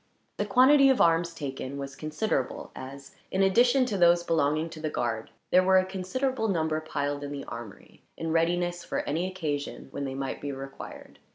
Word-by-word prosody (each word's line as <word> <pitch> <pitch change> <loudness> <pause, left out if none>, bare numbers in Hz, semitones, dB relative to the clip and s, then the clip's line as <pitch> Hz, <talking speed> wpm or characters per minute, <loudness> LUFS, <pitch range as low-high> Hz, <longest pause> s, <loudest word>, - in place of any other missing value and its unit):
The - - -1
quantity 275 +2 +6
of 265 - +3
arms 170 0 +3
taken 140 -3 -5
was 140 -1 -6
considerable 155 -2 -2
as, 135 +1 -9 0.2
in 190 +1 +1
addition 240 +7 +4
to 210 -6 -2
those 175 0 +5
belonging 155 -1 +1
to 160 - -9
the 155 0 -2
guard, 115 -5 -2 0.2
there 185 - +6
were 190 0 +5
a 185 - +4
considerable 225 +7 -2
number 160 -5 0
piled 145 -2 -3
in 145 - -5
the 140 -1 -5
armory, 115 -4 -10 0.2
in 165 -1 -3
readiness 175 +1 +1
for - - -2
any 165 +5 -1
occasion 150 -6 -4
when 140 - -4
they 135 -1 -4
might 135 0 -4
be 145 - -3
required. 135 0 -9
165 Hz, 185 wpm, -28 LUFS, 140-185 Hz, 0.2 s, quantity